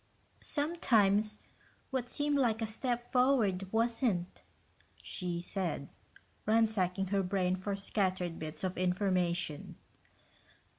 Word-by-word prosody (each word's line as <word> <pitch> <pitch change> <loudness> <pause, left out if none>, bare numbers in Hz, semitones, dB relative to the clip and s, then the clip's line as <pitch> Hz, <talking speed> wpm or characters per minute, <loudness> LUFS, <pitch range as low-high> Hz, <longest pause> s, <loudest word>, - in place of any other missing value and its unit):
"Sometimes 215 -10 +2 0.5
what 250 -2 -2
seemed 290 -1 +1
like 230 -4 +2
a 225 - 0
step 240 +2 -2
forward 225 -8 +2
wasn't," 225 -5 0 0.6
she 175 -2 -3
said, 175 -6 -3 0.6
ransacking 200 -4 +2
her 200 0 +2
brain 185 -1 +1
for 195 +2 -3
scattered 185 -3 -1
bits 155 +1 -6
of 185 -1 -2
information. 180 -4 0
195 Hz, 100 wpm, -33 LUFS, 180-230 Hz, 0.6 s, Sometimes